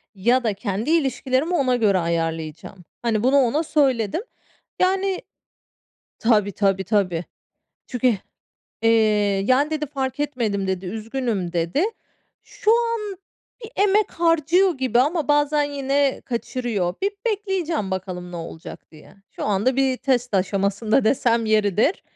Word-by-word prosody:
ya 240 +6 +2
da 220 -3 +1
kendi 200 +5 -3
ilişkilerimi 275 0 +1
ona 260 -6 +2
göre 210 -5 +3
ayarlayacağım." 165 +1 -3 0.2
Hani, 225 -2 0
bunu 265 +3 +4
ona 275 +4 +2
söyledim. 270 - +1 0.6
Yani, 380 +1 +1 1.0
tabii, 210 -3 +2
tabii, 195 -1 +1
tabii. 185 -4 0 0.6
Çünkü, 250 -1 +1 0.7
eee, 225 - +4 0.6
yani, 275 +5 +3
dedi 305 -1 -2
"Fark 270 -1 -4
etmedim," 230 -9 -1
dedi, 190 0 -2
"Üzgünüm," 220 -2 -3
dedi. 170 - 0 0.6
Şu 430 - -1
an 460 -4 0 0.5
bir 450 - -8 0.2
emek 420 +2 +2
harcıyor 335 +1 +2
gibi 255 -2 +2
ama 300 +3 0
bazen 295 0 +3
yine 280 -1 0
kaçırıyor. 235 -6 -2
Bir 400 +1 +1
bekleyeceğim 380 - -1
bakalım 180 -1 -5
ne - - -5
olacak 165 -1 -9
diye. 155 -2 -16 0.2
Şu - - -4
anda 210 +6 +1
bir 265 -1 +2
test 250 -3 0
aşamasında 200 +5 +1
desem 230 -1 +2
yeridir. 215 - +2
245 Hz, 125 wpm, -22 LUFS, 200-295 Hz, 1.0 s, bunu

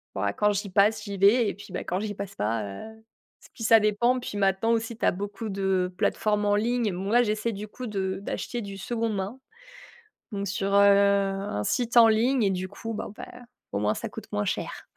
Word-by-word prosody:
ouah, 100 +1 -1
quand 210 - +2
j'y 200 0 -3
passe, 210 +3 +3
j'y 200 -2 -5
vais, 205 +3 +5
et - - -3
puis, 200 - -13
bah, - - -3
quand 180 +2 -2
j'y 210 0 -3
passe 200 0 -7
pas, 110 +1 -1
heu, 160 - -8
et - - -26 0.5
puis 225 - -8
ça 225 0 +7
dépend. 225 +4 +2
Puis, 205 -4 -6
maintenant, 195 +3 +2
aussi, 225 0 -1
tu - - -1
as - - +5
beaucoup 205 +3 -5
de 190 -2 0
plateformes 210 -1 +1
en 205 - +3
ligne. 225 -1 0
Moi, 205 +7 +2
j'essaie, 215 +1 -1
du 210 +2 -6
coup, 250 +3 -8
de 190 -3 -2
d'acheter 240 +3 -4
du 200 -2 -7
seconde 225 +1 -2
main, 195 +7 -4 0.9
donc 200 -1 -3
sur, 195 +1 -2
heu, - - +6
un 200 - +3
site 240 - 0
en 230 -1 +9
ligne, 235 +3 +2
et 195 - +2
du 185 0 -3
coup, 225 +3 -6
bon, 210 - -5
ben, 245 0 -11 0.3
au 100 - -1
moins, 105 +1 +1
ça - - -5
coûte - - -10
moins 105 0 -1
cher. - - -4
205 Hz, 220 wpm, -26 LUFS, 195-225 Hz, 0.9 s, en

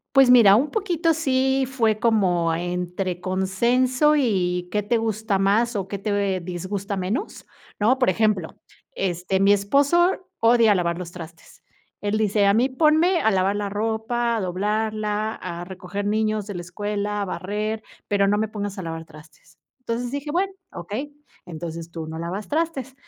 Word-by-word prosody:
Pues, 270 -2 +7
mira, 215 -5 +8
un 280 +6 +1
poquito 345 -6 +1
sí 265 -3 +1
fue 225 -5 +1
como 185 -8 +2
entre 180 +1 -3
consenso, 240 +10 +2
y 180 -8 0
qué 210 0 +1
te 235 +4 +1
gusta 220 -3 -1
más, 215 +4 +2
o 195 -2 -2
qué 200 0 -5
te 200 -2 -1
disgusta 190 +3 -4
menos, 195 - -3 0.3
¿no? 240 +6 +3
Por 250 - +2
ejemplo, 205 -4 0 0.4
este, 185 +1 -1
mi 200 +1 +5
esposo 285 - +2
odia 230 -2 +5
lavar 170 -1 0
los 175 -1 -7
trastes. 165 -2 -12 0.4
Él 205 +1 -1
dice: 210 -1 +2
"A 200 - +4
mí 245 +4 +3
ponme 315 +6 +3
a 220 - +3
lavar 195 +1 +1
la 205 -1 -2
ropa, 225 +3 -1
a - - -1
doblarla, 210 +3 -1
a 175 -1 -6
recoger 190 +2 -6
niños 215 -1 0
de 205 - -6
la 175 - -4
escuela, 205 +3 -3
barrer, 210 +5 -3 0.3
pero 200 -1 +2
no 205 +1 +2
me 220 0 0
pongas 205 -2 -5
a - - -4
lavar 165 -1 -5
trastes". 155 0 -18 0.2
Entonces 240 0 -3
dije, 285 +1 -4
"Bueno, 380 +4 0 0.2
okey, 220 +12 -6 0.3
entonces 165 0 -7
tú 165 -2 -6
no 160 +1 -6
lavas 180 +5 -4
trastes. 290 -5 -2
205 Hz, 165 wpm, -23 LUFS, 185-240 Hz, 0.4 s, mira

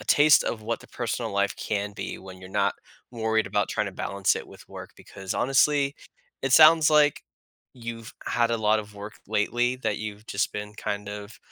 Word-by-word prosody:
a - - -10
taste 150 0 +6
of 115 - -2
what 115 +2 -3
the - - -15
personal 115 -1 -3
life 100 0 0
can 105 -1 -3
be 105 - -6
when 95 -1 -12
you're 95 0 -11
not 100 0 +1 0.4
worried 110 -2 0
about 105 - 0
tryna 105 -3 -2
balance 100 0 0
it - - -7
with - - -15
work - - -9
because, 95 -1 -7
honestly, 140 +2 +2 0.5
it 135 - -1
sounds, 155 +1 +7
like, 150 -1 +4 0.5
you've 115 -2 -8
had 120 -1 +1
a 115 - +1
lot 110 0 +2
of 105 0 -12
work 100 +1 -7 0.2
lately 120 +4 +1
that 115 -5 -2
you've 105 0 -7
just 100 -1 -1
been, 105 0 -6
kind 105 -1 -4
of 105 +1 -8
110 Hz, 195 wpm, -26 LUFS, 105-120 Hz, 0.5 s, sounds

